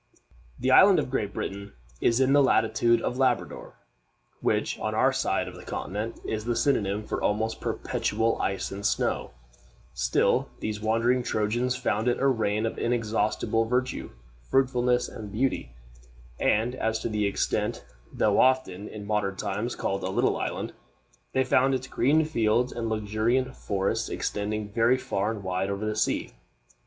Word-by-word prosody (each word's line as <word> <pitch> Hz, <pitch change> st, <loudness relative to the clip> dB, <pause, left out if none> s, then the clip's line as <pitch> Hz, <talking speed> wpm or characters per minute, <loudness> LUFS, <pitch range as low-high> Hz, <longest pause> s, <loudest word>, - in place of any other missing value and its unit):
The 130 Hz, -, 0 dB
island 190 Hz, +7 st, +7 dB
of -, -, -1 dB
Great 105 Hz, -6 st, -1 dB
Britain 100 Hz, +1 st, -5 dB, 0.3 s
is 115 Hz, +1 st, +3 dB
in 135 Hz, +1 st, +4 dB
the 145 Hz, -, +6 dB
latitude 120 Hz, -3 st, +3 dB
of 125 Hz, -, -2 dB
Labrador, 130 Hz, -2 st, 0 dB, 0.6 s
which -, -, 0 dB
on -, -, -2 dB
our -, -, +3 dB
side -, -, 0 dB
of -, -, -7 dB
the -, -, -11 dB
continent 105 Hz, +4 st, -4 dB
is 110 Hz, -1 st, -2 dB
the 120 Hz, 0 st, 0 dB
synonym 110 Hz, -5 st, +1 dB
for -, -, -3 dB
almost 110 Hz, +2 st, 0 dB
perpetual 115 Hz, 0 st, -1 dB
ice 95 Hz, 0 st, -2 dB
and 100 Hz, +1 st, -6 dB
snow; 100 Hz, -, 0 dB, 0.6 s
still -, -, +1 dB
these 105 Hz, -1 st, -4 dB
wandering 115 Hz, +3 st, +2 dB
Trojans 120 Hz, +3 st, 0 dB
found 110 Hz, -1 st, -1 dB
it 120 Hz, -, +1 dB
a 135 Hz, -, +1 dB
region 110 Hz, -4 st, +1 dB
of 115 Hz, -, -3 dB
inexhaustible 115 Hz, -1 st, 0 dB
verdure, 125 Hz, +2 st, -1 dB, 0.4 s
fruitfulness, 125 Hz, -2 st, +2 dB
and 105 Hz, -3 st, -8 dB
beauty; 105 Hz, -, -1 dB, 0.6 s
and 115 Hz, +4 st, +2 dB
as 110 Hz, -3 st, -1 dB
to -, -, -3 dB
its 110 Hz, -2 st, -3 dB
extent, -, -, -1 dB, 0.3 s
though 105 Hz, -1 st, +2 dB
often, 115 Hz, -7 st, +2 dB
in 105 Hz, -1 st, -8 dB
modern 105 Hz, -2 st, -1 dB
times, 105 Hz, +4 st, -3 dB
called 100 Hz, 0 st, -2 dB
a 95 Hz, -, -2 dB
little 95 Hz, -, +1 dB
island, -, -, -3 dB, 0.6 s
they 130 Hz, -, +3 dB
found 130 Hz, +1 st, +3 dB
its 130 Hz, 0 st, -3 dB
green 145 Hz, +5 st, +2 dB
fields 120 Hz, -4 st, +1 dB
and 115 Hz, -1 st, -3 dB
luxuriant 110 Hz, +5 st, 0 dB
forests 100 Hz, -1 st, -1 dB
extending 105 Hz, 0 st, -3 dB
very 115 Hz, +3 st, +4 dB
far 105 Hz, -4 st, -1 dB
and 110 Hz, -3 st, -4 dB
wide 95 Hz, +1 st, -1 dB
over 100 Hz, +2 st, -3 dB
the 110 Hz, 0 st, -1 dB
sea. 105 Hz, -, 0 dB
110 Hz, 160 wpm, -27 LUFS, 105-125 Hz, 0.6 s, island